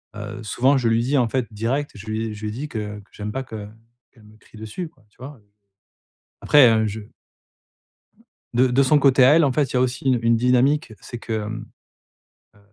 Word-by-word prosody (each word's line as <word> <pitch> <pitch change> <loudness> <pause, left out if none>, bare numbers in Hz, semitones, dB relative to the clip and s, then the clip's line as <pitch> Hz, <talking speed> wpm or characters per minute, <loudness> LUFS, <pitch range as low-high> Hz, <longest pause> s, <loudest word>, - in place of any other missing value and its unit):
heu, 105 +2 -7
souvent 130 +6 +2
je 125 -3 0
lui 115 +1 +2
dis 135 +3 +1
en 120 -2 +1
fait 130 -1 -1
direct, 125 +7 -2
je 105 +1 -12
lui 110 +1 -2
ai - - -6
je 105 - -11
lui 105 - -4
ai - - -5
dis 135 +8 -5
que 105 -4 -5
que 100 - -19
j'aime 105 0 -6
pas 135 +2 -4
que 110 -4 -8 0.4
qu'elle 110 - -22
me 105 +1 -19
crie 110 - -18
dessus, 110 - -6
quoi, 125 -8 -29
tu - - -34
vois, 140 +3 -9
heu? 105 - -26 1.0
Après, 145 -4 +6
hein, 110 -1 +2
je 105 +2 -5 1.5
de 125 +2 +4
de 130 +3 +3
son 145 +2 +4
côté 135 -2 +5
à 140 +5 +7
elle, 165 - +5
en 135 - +1
fait, 140 -1 0
il - - -4
y - - +3
a 125 - +3
aussi 130 +1 -2
une 130 -2 +3
une 115 0 +3
dynamique, 125 +2 +2
c'est 120 - -8
que, 115 - -6
hem, 110 +1 -5 0.9
heu - - -23
120 Hz, 235 wpm, -22 LUFS, 110-135 Hz, 1.5 s, à